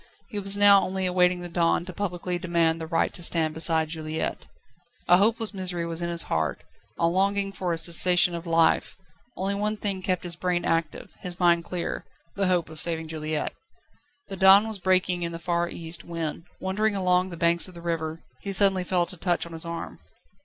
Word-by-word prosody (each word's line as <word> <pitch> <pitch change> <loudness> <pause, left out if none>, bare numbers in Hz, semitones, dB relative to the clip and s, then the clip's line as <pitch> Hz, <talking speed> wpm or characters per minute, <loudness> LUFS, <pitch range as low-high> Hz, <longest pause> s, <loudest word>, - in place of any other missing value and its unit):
He 210 - -4
was 195 0 +4
now 200 -1 +7
only 190 0 -2
awaiting 180 0 +2
the 175 - -6
dawn 170 0 +1
to 185 - -8
publicly 180 -2 -3
demand 170 -2 +1
the 160 - -5
right 165 0 0
to - - -9
stand 165 -2 0
beside 160 -1 +3
Juliette. 160 0 -4 0.6
A 175 - +6
hopeless 220 +2 +1
misery 180 -3 -3
was 165 0 -5
in 170 - -2
his 170 0 +1
heart, - - -2 0.3
a 170 - +1
longing 195 +3 +1
for 185 -2 -3
a 165 - -1
cessation 175 +1 +4
of 170 0 -6
life; 165 -1 +2 0.4
only 195 +2 -1
one 210 +2 -1
thing 200 -3 -3
kept 185 -1 -1
his 175 -1 -5
brain 175 0 -1
active, 165 -3 -2
his 180 -1 -5
mind 170 -1 +3
clear: 180 -2 -4 0.3
the 195 -1 0
hope 175 -3 0
of 160 0 -7
saving 165 -1 -2
Juliette. 155 -1 -3 0.7
The 195 - -7
dawn 195 +3 +7
was 220 -3 -4
breaking 185 -1 +1
in 170 0 -3
the - - -4
far 170 +1 -1
east 165 -1 -6
when, 165 -1 -5
wandering 205 +3 0
along 185 -1 +2
the 170 - -8
banks 170 +1 +2
of 185 - -13
the - - -9
river, 165 -1 -3 0.2
he 200 - -5
suddenly 195 -1 +3
felt 180 0 -1
a - - -12
touch 175 +1 0
on 170 - -11
his 165 +1 -3
arm. 170 0 -6
175 Hz, 205 wpm, -25 LUFS, 165-190 Hz, 0.7 s, now